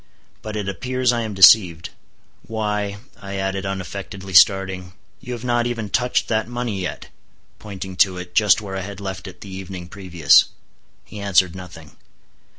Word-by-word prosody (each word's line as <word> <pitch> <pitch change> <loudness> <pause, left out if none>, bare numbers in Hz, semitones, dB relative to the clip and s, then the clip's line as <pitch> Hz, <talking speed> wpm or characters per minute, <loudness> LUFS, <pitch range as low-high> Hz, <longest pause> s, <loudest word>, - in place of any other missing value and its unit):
But 110 0 -6
it 105 -2 -3
appears 125 +5 0
I 120 - -1
am 110 -3 -5
deceived. 90 -4 +6 0.6
Why," 105 -2 -2 0.2
I 100 -1 -7
added, 95 0 -2
unaffectedly 95 0 -6
starting, 95 0 +4 0.3
"you 125 - -7
have 120 -1 -7
not 120 -1 +1
even 115 -4 -4
touched 125 -1 +1
that 110 0 0
money 120 -5 -3
yet," 90 - -6 0.5
pointing 95 -2 -8
to 95 -1 +3
it, 90 0 -8
just 105 -1 +4
where 95 -2 -6
I 95 - -3
had 100 +1 -8
left 95 -2 -6
it 90 -1 -12
the 100 -2 -9
evening 95 -2 -7
previous. 90 -6 +4 0.6
He 105 - -10
answered 95 -3 +2
nothing. 85 -5 -12
95 Hz, 160 wpm, -21 LUFS, 95-110 Hz, 0.6 s, deceived